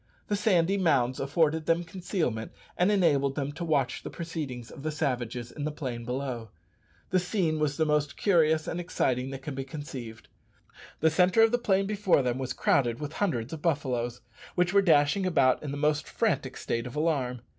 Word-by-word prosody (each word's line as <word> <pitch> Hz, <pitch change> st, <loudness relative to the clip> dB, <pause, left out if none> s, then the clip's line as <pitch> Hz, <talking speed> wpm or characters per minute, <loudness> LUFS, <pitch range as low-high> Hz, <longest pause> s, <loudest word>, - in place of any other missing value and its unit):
The 205 Hz, -, +2 dB
sandy 195 Hz, -2 st, +2 dB
mounds 130 Hz, -8 st, +2 dB
afforded 155 Hz, +2 st, +1 dB
them 165 Hz, +1 st, +2 dB
concealment, 170 Hz, -, -3 dB, 0.2 s
and 180 Hz, +3 st, +3 dB
enabled 145 Hz, -9 st, +2 dB
them 140 Hz, -1 st, -2 dB
to 170 Hz, -, -6 dB
watch 145 Hz, -6 st, 0 dB
the -, -, -6 dB
proceedings 145 Hz, -8 st, -6 dB
of -, -, -10 dB
the 155 Hz, -, -2 dB
savages 125 Hz, -6 st, -2 dB
in 145 Hz, -, -6 dB
the 150 Hz, -, -1 dB
plain 125 Hz, -6 st, -5 dB
below. 125 Hz, -3 st, -4 dB, 0.6 s
The 185 Hz, -, +4 dB
scene 175 Hz, -4 st, 0 dB
was 145 Hz, -2 st, 0 dB
the 160 Hz, -, +2 dB
most 150 Hz, -1 st, 0 dB
curious 160 Hz, -5 st, +3 dB
and 175 Hz, -, -3 dB
exciting 130 Hz, -7 st, -1 dB
that 135 Hz, 0 st, -7 dB
can 145 Hz, -, -5 dB
be 135 Hz, 0 st, -4 dB
conceived. 130 Hz, -5 st, -8 dB, 0.7 s
The 160 Hz, +1 st, +4 dB
centre 180 Hz, +6 st, +4 dB
of 225 Hz, -, +4 dB
the 245 Hz, -, +2 dB
plain 195 Hz, -4 st, +2 dB
before 195 Hz, -7 st, +2 dB
them 125 Hz, 0 st, -1 dB
was 130 Hz, -1 st, -3 dB
crowded 120 Hz, -4 st, +1 dB
with 150 Hz, 0 st, -5 dB
hundreds 140 Hz, -, -1 dB
of 160 Hz, -, -6 dB
buffaloes, 125 Hz, -7 st, -1 dB, 0.3 s
which 180 Hz, +1 st, +2 dB
were 200 Hz, -, +6 dB
dashing 165 Hz, +1 st, +3 dB
about 135 Hz, -7 st, +3 dB
in 150 Hz, -, -5 dB
the 140 Hz, -, -4 dB
most 150 Hz, +1 st, +1 dB
frantic -, -, -1 dB
state 115 Hz, +1 st, -2 dB
of 125 Hz, -, -9 dB
alarm. 140 Hz, -6 st, 0 dB
150 Hz, 190 wpm, -28 LUFS, 130-170 Hz, 0.7 s, were